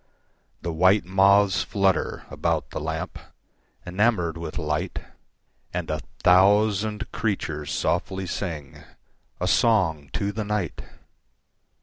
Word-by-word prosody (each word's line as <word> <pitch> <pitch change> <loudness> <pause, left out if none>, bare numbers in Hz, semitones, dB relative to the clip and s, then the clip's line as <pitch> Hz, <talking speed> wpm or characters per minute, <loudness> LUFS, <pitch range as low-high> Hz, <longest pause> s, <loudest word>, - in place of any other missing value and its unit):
The 85 - -2
white 95 +5 +4
moths 95 +1 +4
flutter 95 -4 0
about - - -1
the - - -4
lamp, - - -4 0.7
Enamoured 90 -3 +1
with 85 -2 -6
light; 75 -1 -2 0.8
And 90 -3 -2
a 75 -1 -2 0.2
thousand 105 +3 +3
creatures 85 -8 -2
softly 95 -1 -1
singA 80 -7 -5 0.6
song 80 - +2
to 100 0 -1
the 110 +1 -3
night! 105 -6 -2
95 Hz, 100 wpm, -25 LUFS, 80-105 Hz, 0.8 s, white